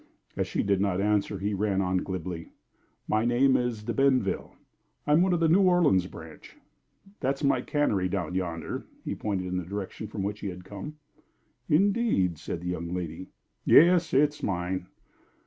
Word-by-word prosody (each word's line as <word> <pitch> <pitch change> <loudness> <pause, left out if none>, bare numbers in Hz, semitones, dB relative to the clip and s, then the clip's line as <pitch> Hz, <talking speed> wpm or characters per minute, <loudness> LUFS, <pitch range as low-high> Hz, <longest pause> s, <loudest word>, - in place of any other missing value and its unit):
As - - -1
she - - -1
did 100 -1 +1
not 100 -2 +1
answer, 105 0 +1
he 100 +2 -2
ran 100 -1 0
on, 95 -1 +1
glibly: 90 -2 -4 0.6
"My 110 +1 +1
name 125 +3 +3
is 120 -3 -1
De 120 +2 -3
Benville 135 0 +1 0.5
I'm 150 +3 +4
one 185 +1 +3
of 175 - +2
the 165 - +3
New 175 +5 +5
Orleans 175 - +4
branch. - - -12 0.6
That's 135 +2 -1
my 135 -3 +3
cannery 105 -11 0
down 90 -2 -2
yonder." 85 -3 -4 0.2
He - - -2
pointed 95 -3 -3
in 90 0 -2
the 90 - -2
direction 100 +3 -6
from 100 -1 -5
which 105 +1 -3
he 100 - -5
had 90 -1 -6
just - - -19
come. 105 +9 -7 0.7
"Indeed!" 185 - +2
said 85 +1 -5
the 90 - -4
young 85 -1 -4
lady. 90 0 -5 0.4
"Yes. 170 0 +6
It's 145 +2 +2
mine." 90 -1 -2
100 Hz, 175 wpm, -27 LUFS, 90-140 Hz, 0.7 s, Yes